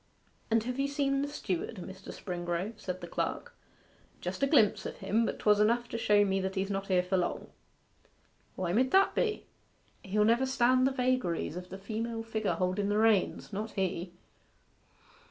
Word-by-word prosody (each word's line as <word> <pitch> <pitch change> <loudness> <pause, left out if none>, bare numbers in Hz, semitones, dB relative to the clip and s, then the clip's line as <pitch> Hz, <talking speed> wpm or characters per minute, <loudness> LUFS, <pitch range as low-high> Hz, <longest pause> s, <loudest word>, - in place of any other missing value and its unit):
'And 225 -1 +3
have 250 +3 -4
you 275 - +2
seen 280 -1 0
the 285 - -1
steward, 225 - -3
Mr. 190 0 -9
Springrove?' 175 +3 -4
said 185 -2 -5
the - - -6
clerk. - - -3 0.7
'Just - - -5
a 275 - +4
glimpse 225 -9 +4
of - - -8
him; 225 +2 +1
but - - -3
'twas 210 -1 +4
just 210 - +4
enough 240 +2 +2
to - - -3
show 210 -2 +4
me 195 -1 0
that 190 +1 -3
he's 195 +1 -1
not 195 0 -3
here 180 -2 +3
for 185 +1 0
long.' 175 - -2 1.1
'Why 175 -2 -2
mid 255 +5 +3
that 390 +5 +4
be?' 430 -3 -1 0.6
'He'll 210 +2 +1
never 235 +4 +3
stand 255 0 +3
the - - +1
vagaries 250 - 0
of 180 0 -7
the 190 - -7
female 225 +3 -4
figure 220 -2 -1
holden 185 +2 0
the 205 - +1
reins 215 -2 +2
not 215 +2 -4
he. 180 -2 -2
210 Hz, 185 wpm, -30 LUFS, 190-240 Hz, 1.1 s, a